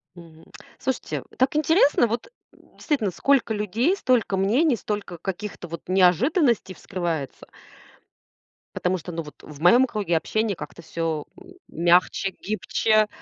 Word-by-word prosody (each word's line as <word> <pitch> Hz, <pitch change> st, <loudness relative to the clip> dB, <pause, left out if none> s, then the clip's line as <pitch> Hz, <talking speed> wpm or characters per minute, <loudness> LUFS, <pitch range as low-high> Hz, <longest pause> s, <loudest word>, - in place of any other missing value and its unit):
Мгм. 165 Hz, -2 st, -15 dB, 0.3 s
Слушайте, 265 Hz, 0 st, -3 dB
так 260 Hz, +3 st, +2 dB
интересно. 305 Hz, -5 st, +4 dB
Вот, 230 Hz, -, -4 dB, 0.2 s
м, -, -, -24 dB
действительно, 265 Hz, -, -1 dB
сколько 255 Hz, +3 st, +2 dB
людей, 220 Hz, -, 0 dB
столько 245 Hz, -, +1 dB
мнений, 245 Hz, -, +3 dB
столько 205 Hz, -5 st, -5 dB
каких-то 195 Hz, 0 st, -6 dB
вот 170 Hz, 0 st, -7 dB
неожиданностей 195 Hz, -, +3 dB
вскрывается. 170 Hz, -8 st, -4 dB, 1.3 s
Потому 180 Hz, +1 st, 0 dB
что, 175 Hz, +1 st, -8 dB
ну, 165 Hz, 0 st, -3 dB
вот 150 Hz, -, -14 dB
в 150 Hz, -2 st, -12 dB
моем 240 Hz, +10 st, +6 dB
круге 200 Hz, -7 st, -1 dB
общения 215 Hz, +4 st, -1 dB
как-то 150 Hz, +2 st, -9 dB
всё 165 Hz, -2 st, -3 dB, 0.2 s
м 370 Hz, 0 st, -14 dB
мягче, 175 Hz, +3 st, +2 dB
гибче. 215 Hz, +1 st, +1 dB
200 Hz, 130 wpm, -24 LUFS, 175-245 Hz, 1.3 s, моем